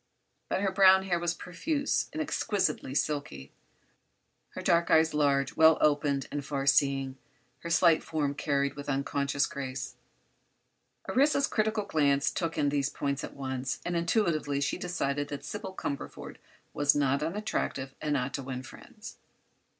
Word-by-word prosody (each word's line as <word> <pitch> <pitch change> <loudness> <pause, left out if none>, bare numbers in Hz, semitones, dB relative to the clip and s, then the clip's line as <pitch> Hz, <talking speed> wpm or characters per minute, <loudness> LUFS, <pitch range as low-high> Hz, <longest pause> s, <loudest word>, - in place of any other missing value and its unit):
But - - 0
her 195 -1 +1
brown 190 0 +6
hair 180 -3 0
was 170 0 -1
profuse 285 - -2
and 310 - -5
exquisitely 190 - -1
silky; 140 - -2 1.0
her - - -4
dark 170 0 +3
eyes 160 0 +4
large, 140 -2 +1
well 160 0 +6
opened 145 -2 +1
and 145 0 -3
far 140 -1 -3
seeing; 135 -1 +2 0.4
her 170 - -7
slight 165 -1 +4
form 145 -3 -2
carried 140 -1 0
with 145 0 -7
unconscious 140 +1 0
grace. 130 -1 -5 1.1
Orissa's 280 +1 +3
critical 215 -3 0
glance 145 -6 +2
took 165 -3 -3
in 145 - +2
these 140 -1 0
points 140 -2 -3
at - - -7
once, 130 -1 -3
and 175 - -2
intuitively 170 -5 +1
she 140 +5 -1
decided 145 -5 -2
that 145 -1 -7
Sybil 190 +6 -6
Cumberford 140 -5 -6 0.4
was 145 0 +3
not 140 -1 +1
unattractive 155 -6 -3
and 150 -1 0
ought 130 +1 -2
to 140 - -3
win 130 -1 -5
friends. - - -12
145 Hz, 150 wpm, -29 LUFS, 140-170 Hz, 1.1 s, brown